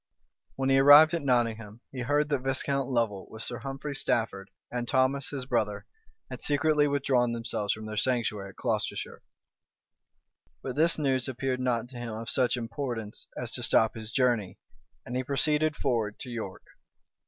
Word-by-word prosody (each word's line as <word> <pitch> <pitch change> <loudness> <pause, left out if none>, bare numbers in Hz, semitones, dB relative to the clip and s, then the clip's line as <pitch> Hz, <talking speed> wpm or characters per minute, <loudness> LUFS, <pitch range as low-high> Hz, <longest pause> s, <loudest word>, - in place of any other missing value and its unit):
When 135 0 0
he 135 - +5
arrived 145 +3 +9
at 170 - 0
Nottingham, 115 -4 0
he 130 - -7
heard 145 +4 +1
that 145 -2 +1
Viscount 135 +1 -1
Lovel, 115 -6 -1
with 110 0 -6
Sir 120 - -1
Humphrey 135 +1 -5
Stafford, 105 -6 -1 0.2
and 120 -1 -3
Thomas 130 +1 +1
his 135 -3 -4
brother, 110 -5 -1 0.4
had - - -8
secretly 150 0 +2
withdrawn 130 -4 +1
themselves 115 -3 -2
from 110 0 -4
their 110 0 -6
sanctuary 110 -4 0
at - - -15
Colchester: 110 -5 -3 1.4
but 130 - -4
this 165 +3 +3
news 135 -4 0
appeared 130 0 -2
not 120 -2 0
to 125 - -10
him 115 -2 -5
of 115 +1 -5
such 125 -1 +2
importance 115 -2 -5
as - - -4
to - - -3
stop 110 -1 +3
his 110 -1 -7
journey; 120 -8 +1 0.5
and 125 - -5
he 130 - 0
proceeded 150 +3 +2
forward 115 -7 -1
to 125 - -6
York. 110 -5 -6
125 Hz, 165 wpm, -28 LUFS, 115-140 Hz, 1.4 s, arrived